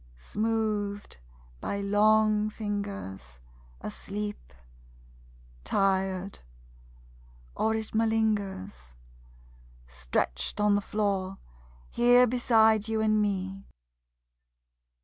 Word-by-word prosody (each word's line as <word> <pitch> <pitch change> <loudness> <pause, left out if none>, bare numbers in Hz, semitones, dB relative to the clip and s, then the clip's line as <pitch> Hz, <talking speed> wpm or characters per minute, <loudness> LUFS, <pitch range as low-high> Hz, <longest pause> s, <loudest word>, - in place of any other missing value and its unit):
Smoothed 210 - -2 0.4
by 200 - -3
long 215 +1 +3
fingers, 200 - -5 0.4
Asleep... 205 - -5 1.1
tired... 190 - 0 1.2
or 220 0 +1
it 220 -1 -4
malingers. 205 - -1 0.9
Stretched 60 - -2
on 210 0 +4
the 205 - +2
floor, 195 -2 -1 0.5
here 245 +1 +6
beside 220 -3 +3
you 225 0 -1
and 215 -1 +2
me. 195 -1 -2
205 Hz, 70 wpm, -28 LUFS, 190-220 Hz, 1.2 s, here